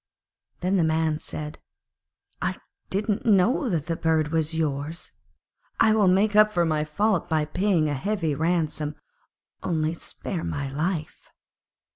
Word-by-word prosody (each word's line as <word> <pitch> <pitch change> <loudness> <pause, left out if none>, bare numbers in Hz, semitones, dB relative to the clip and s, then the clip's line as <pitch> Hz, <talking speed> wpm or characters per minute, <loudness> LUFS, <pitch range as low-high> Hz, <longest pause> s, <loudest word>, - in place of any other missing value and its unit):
Then 185 +2 +1
the 175 - +3
Man 160 -1 +1
said, 150 -1 -6 0.8
'I - - -1 0.3
didn't 205 +1 -1
know 225 +6 +3
that 165 -6 -1
the 165 - -1
bird 160 -2 +1
was 160 0 0
yours. 155 +1 -3 0.7
I 220 - +5
will 210 -3 +4
make 200 +3 +3
up 215 0 +6
for 175 -4 +2
my 155 -2 +1
fault 195 +4 0
by 155 -2 +1
paying 175 0 +1
a 145 - -1
heavy 165 +1 -1
ransom. 155 -1 -1 0.7
Only 160 -1 0
spare 170 +1 -5
my 140 -1 -3
life.' 155 +2 -3
165 Hz, 140 wpm, -25 LUFS, 155-195 Hz, 0.8 s, up